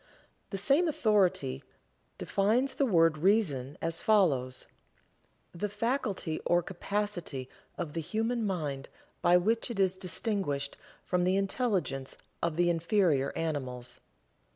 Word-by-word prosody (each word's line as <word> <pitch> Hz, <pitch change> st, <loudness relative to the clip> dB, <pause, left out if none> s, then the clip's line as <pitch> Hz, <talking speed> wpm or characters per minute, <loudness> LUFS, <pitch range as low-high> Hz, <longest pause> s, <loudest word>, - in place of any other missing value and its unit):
The 195 Hz, -, -3 dB
same 275 Hz, -, +3 dB
authority 205 Hz, -, +1 dB, 0.5 s
defines 230 Hz, +7 st, +1 dB
the 280 Hz, -, +1 dB
word 165 Hz, -6 st, +4 dB
Reason 150 Hz, -, +1 dB
as 165 Hz, 0 st, -1 dB
follows: 140 Hz, -12 st, +2 dB, 0.9 s
"The 205 Hz, +4 st, -3 dB
faculty 210 Hz, -, -2 dB
or 175 Hz, 0 st, +2 dB
capacity 185 Hz, -8 st, -3 dB, 0.3 s
of 165 Hz, -4 st, -4 dB
the 165 Hz, -, -2 dB
human 225 Hz, +7 st, -1 dB
mind 150 Hz, -9 st, -3 dB, 0.3 s
by 175 Hz, +1 st, +6 dB
which 225 Hz, +7 st, +1 dB
it 230 Hz, -4 st, -4 dB
is 190 Hz, -1 st, +2 dB
distinguished 185 Hz, -, -2 dB, 0.3 s
from 180 Hz, -1 st, +1 dB
the 185 Hz, +2 st, +2 dB
intelligence 195 Hz, -, -1 dB, 0.2 s
of 170 Hz, -2 st, 0 dB
the 175 Hz, +1 st, +3 dB
inferior 170 Hz, -5 st, +2 dB
animals." 130 Hz, -6 st, -4 dB
180 Hz, 120 wpm, -30 LUFS, 155-210 Hz, 0.9 s, by